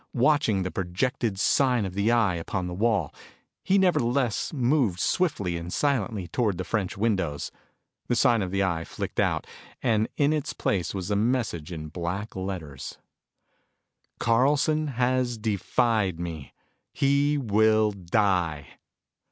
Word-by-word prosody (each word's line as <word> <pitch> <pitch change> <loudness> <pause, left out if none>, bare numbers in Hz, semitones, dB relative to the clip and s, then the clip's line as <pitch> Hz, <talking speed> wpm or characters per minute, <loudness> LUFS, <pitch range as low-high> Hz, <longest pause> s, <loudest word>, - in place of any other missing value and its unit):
Watching 125 -6 +3
the 90 - -3
projected 95 +4 -1
sign 125 -2 +3
of 95 - -5
the 100 +3 +1
eye 115 -6 +3
upon 90 +2 -3
the 90 - -4
wall, 105 -4 0 0.5
he 195 - +2
nevertheless 135 - +1
moved 125 - +1
swiftly 100 - 0
and 85 +1 -6
silently 110 -9 0
toward 105 -1 0
the 95 - -3
French 95 -2 -2
windows. 95 -9 -1 0.6
The 120 - +1
sign 115 -1 +3
of 95 - -2
the 95 +1 0
Eye 85 -3 -1
flicked - - -5
out, - - +1 0.4
and 110 -3 +2
in 145 +1 +3
its 150 -3 -2
place 90 -2 -1
was 95 +1 -4
a - - +2
message 105 -7 -1
in 80 -2 -6
black 90 +6 -4
letters: 90 -8 -6 1.2
CARLSON 145 +6 +2
HAS 125 -2 0
DEFIED 105 -3 0
ME. 80 -5 -6 0.4
HE 140 +1 +2
WILL 110 -3 +3
DIE. 90 -5 0
105 Hz, 135 wpm, -26 LUFS, 90-125 Hz, 1.2 s, Watching